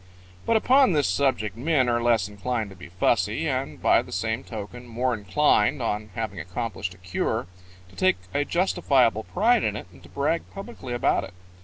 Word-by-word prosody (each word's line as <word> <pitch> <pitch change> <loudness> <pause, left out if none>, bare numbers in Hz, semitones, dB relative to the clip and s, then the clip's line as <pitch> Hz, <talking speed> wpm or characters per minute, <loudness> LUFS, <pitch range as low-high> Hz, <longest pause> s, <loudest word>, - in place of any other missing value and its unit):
"] 90 0 -24
But 230 - +4
upon 260 -1 +4
this 145 -3 +2
subject 110 -1 0
men 130 +1 +1
are 120 -1 +1
less 115 -5 +2
inclined 105 +1 -3
to - - -12
be 90 0 -12
fussy, 90 +1 +1
and - - -2
by - - +4
the - - -12
same 110 +6 -2
token 120 +2 -8
more 125 +2 -1
inclined, 115 +4 +2
on 105 -3 -2
having 110 -5 -4
accomplished 95 +1 -4
a - - -19
cure, 90 0 -2 0.4
to 90 - -19
take 95 0 +3 0.2
a 145 - +2
justifiable 140 - +2
pride 225 +4 +2
in 105 - 0
it 105 - -6
and - - -17
to - - -16
brag 145 +4 0
publicly 195 - -7
about 120 - +1
it. 90 - -10
115 Hz, 190 wpm, -25 LUFS, 100-140 Hz, 0.4 s, But